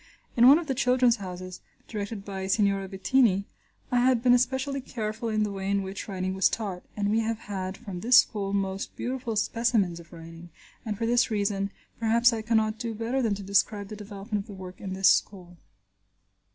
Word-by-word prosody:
In 240 Hz, +1 st, +6 dB
one 280 Hz, +3 st, +9 dB
of 340 Hz, -, -3 dB
the 275 Hz, -, -1 dB
"Children's 250 Hz, -1 st, +3 dB
Houses," 185 Hz, -2 st, -8 dB, 0.3 s
directed 205 Hz, -1 st, -5 dB
by 190 Hz, -1 st, -5 dB
Signorina 195 Hz, -1 st, +1 dB
Bettini, 200 Hz, 0 st, +2 dB, 0.5 s
I 245 Hz, -, +3 dB
had 245 Hz, -1 st, +3 dB
been 245 Hz, -1 st, +6 dB
especially 265 Hz, +3 st, +1 dB
careful 225 Hz, -2 st, -4 dB
in 215 Hz, -1 st, +1 dB
the 210 Hz, -, -2 dB
way 195 Hz, 0 st, -4 dB
in 200 Hz, 0 st, +1 dB
which 190 Hz, +1 st, -6 dB
writing 185 Hz, -2 st, -3 dB
was 190 Hz, 0 st, +3 dB
taught, 195 Hz, -5 st, -4 dB, 0.2 s
and 205 Hz, 0 st, 0 dB
we 220 Hz, -, +2 dB
have 225 Hz, 0 st, -1 dB
had 190 Hz, -1 st, -5 dB
from 200 Hz, -7 st, -7 dB
this 245 Hz, +6 st, +5 dB
school 200 Hz, -5 st, +2 dB
most 195 Hz, -1 st, -2 dB
beautiful 245 Hz, -2 st, -3 dB
specimens 215 Hz, -5 st, +1 dB
of 170 Hz, -1 st, -15 dB
writing, 165 Hz, 0 st, -11 dB, 0.4 s
and 210 Hz, -2 st, -2 dB
for 230 Hz, -, -2 dB
this 240 Hz, +2 st, +3 dB
reason, 200 Hz, -2 st, -1 dB, 0.3 s
perhaps 230 Hz, +2 st, +4 dB
I 225 Hz, -, -2 dB
cannot 220 Hz, -1 st, +1 dB
do 230 Hz, -2 st, -4 dB
better 235 Hz, +5 st, -1 dB
than 220 Hz, -4 st, +1 dB
to 200 Hz, -, -8 dB
describe 200 Hz, +1 st, +1 dB
the 215 Hz, -, -6 dB
development 205 Hz, 0 st, -5 dB
of 200 Hz, -, -14 dB
the 205 Hz, -, -9 dB
work 185 Hz, -1 st, -10 dB
in 190 Hz, -2 st, -5 dB
this 190 Hz, 0 st, +3 dB
school. 180 Hz, -3 st, +1 dB
210 Hz, 200 wpm, -27 LUFS, 195-235 Hz, 0.5 s, one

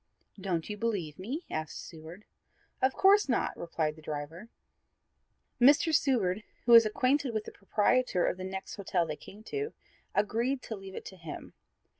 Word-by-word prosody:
"Don't 180 Hz, -4 st, -2 dB
you 210 Hz, -, -5 dB
believe 195 Hz, -9 st, -2 dB
me?" 265 Hz, -, -4 dB
asked 155 Hz, -1 st, -4 dB
Seward. 165 Hz, +5 st, -10 dB, 0.6 s
"Of 260 Hz, 0 st, +2 dB
course 395 Hz, -3 st, +5 dB
not," 240 Hz, -, +1 dB
replied 160 Hz, -2 st, -2 dB
the 155 Hz, -, -14 dB
driver. 155 Hz, +7 st, -6 dB, 1.1 s
Mr. 290 Hz, +5 st, +6 dB
Seward, 220 Hz, -10 st, +2 dB, 0.2 s
who 240 Hz, -, +3 dB
was 230 Hz, -2 st, +9 dB
acquainted 255 Hz, +2 st, +1 dB
with 215 Hz, -, 0 dB
the -, -, -8 dB
proprietor 205 Hz, -1 st, +1 dB
of -, -, 0 dB
the 185 Hz, -, -6 dB
next 190 Hz, +2 st, -6 dB
hotel 185 Hz, -3 st, 0 dB
they 155 Hz, -2 st, -4 dB
came 205 Hz, +7 st, -13 dB
to, 425 Hz, -, -4 dB, 0.4 s
agreed 235 Hz, +6 st, +1 dB
to 220 Hz, -, -5 dB
leave 195 Hz, -1 st, -10 dB
it -, -, -7 dB
to 190 Hz, -, -9 dB
him. 165 Hz, -3 st, -8 dB
205 Hz, 165 wpm, -30 LUFS, 175-255 Hz, 1.1 s, was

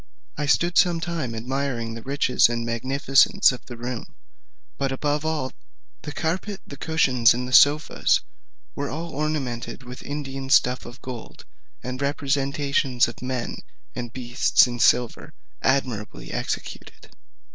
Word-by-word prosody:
I 150 Hz, 0 st, -2 dB
stood 170 Hz, +4 st, +3 dB
some 175 Hz, -3 st, +3 dB
time 165 Hz, -8 st, -3 dB
admiring 125 Hz, -1 st, -2 dB
the 115 Hz, -, -7 dB
riches 135 Hz, -2 st, +3 dB
and 115 Hz, 0 st, -2 dB
magnificence 135 Hz, +5 st, +3 dB
of 125 Hz, -, -8 dB
the 120 Hz, -, -8 dB
room; 120 Hz, 0 st, -6 dB, 0.6 s
but 135 Hz, -1 st, 0 dB
above 145 Hz, +2 st, -1 dB
all, 155 Hz, -5 st, -1 dB, 0.5 s
the 150 Hz, -, -6 dB
carpet, 185 Hz, +6 st, -2 dB
the 140 Hz, -, -9 dB
cushions, 130 Hz, -6 st, +3 dB
and 125 Hz, +1 st, -3 dB
the 130 Hz, -, -6 dB
sofas, 150 Hz, +3 st, +5 dB
which -, -, -1 dB, 0.5 s
were 140 Hz, 0 st, -3 dB
all 165 Hz, +4 st, -5 dB
ornamented 140 Hz, -5 st, -3 dB
with 125 Hz, 0 st, -9 dB
Indian 135 Hz, -2 st, -5 dB
stuff 125 Hz, -3 st, +3 dB
of 120 Hz, +2 st, -12 dB
gold, 125 Hz, -3 st, -8 dB, 0.4 s
and 125 Hz, +1 st, -5 dB
representations 140 Hz, -2 st, +1 dB
of 120 Hz, -, -9 dB
men 125 Hz, -1 st, -3 dB, 0.4 s
and 120 Hz, -1 st, -5 dB
beasts 120 Hz, 0 st, +3 dB
in 120 Hz, -1 st, -5 dB
silver, 120 Hz, 0 st, +2 dB, 0.3 s
admirably 130 Hz, -6 st, -1 dB
executed. -, -, -5 dB
135 Hz, 140 wpm, -24 LUFS, 125-145 Hz, 0.6 s, sofas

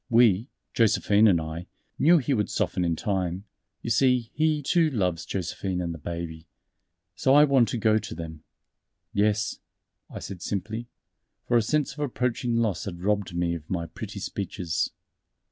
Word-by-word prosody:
We 115 Hz, -2 st, +4 dB, 0.3 s
Josephine 105 Hz, -1 st, +4 dB
and 90 Hz, -5 st, +4 dB
I 80 Hz, +2 st, -6 dB, 0.3 s
knew 170 Hz, +4 st, +6 dB
he 140 Hz, -2 st, 0 dB
would 105 Hz, -5 st, 0 dB
soften 90 Hz, -, 0 dB
in 85 Hz, -1 st, +1 dB
time; 95 Hz, -1 st, -2 dB, 0.4 s
you 115 Hz, -, -2 dB
see 125 Hz, -2 st, +3 dB
he, 155 Hz, -1 st, +1 dB
too, 165 Hz, +2 st, +3 dB
loves 90 Hz, -, -1 dB
Josephine 95 Hz, 0 st, -3 dB
and 85 Hz, -1 st, -2 dB
the 80 Hz, -, -9 dB
Baby. 85 Hz, 0 st, -6 dB, 0.7 s
So 135 Hz, +1 st, +3 dB
I 145 Hz, -, +8 dB
want 135 Hz, -5 st, +4 dB
to -, -, -2 dB
go 110 Hz, -1 st, +3 dB
to 105 Hz, -, -7 dB
them." 80 Hz, -2 st, -8 dB, 0.7 s
"Yes," 105 Hz, 0 st, +1 dB, 0.5 s
I -, -, -8 dB
said 95 Hz, -3 st, -7 dB
simply, 110 Hz, +4 st, -3 dB, 0.6 s
for 120 Hz, -, +2 dB
a 120 Hz, -, +6 dB
sense 150 Hz, +6 st, 0 dB
of 150 Hz, -, -13 dB
approaching 125 Hz, -3 st, -1 dB
loss 115 Hz, -5 st, 0 dB
had 90 Hz, -2 st, -6 dB
robbed 100 Hz, -3 st, 0 dB
me 85 Hz, -1 st, 0 dB
of 80 Hz, -3 st, -7 dB
my 85 Hz, -3 st, -1 dB
pretty 80 Hz, -, -7 dB
speeches. 90 Hz, +1 st, -2 dB
105 Hz, 165 wpm, -26 LUFS, 85-120 Hz, 0.7 s, I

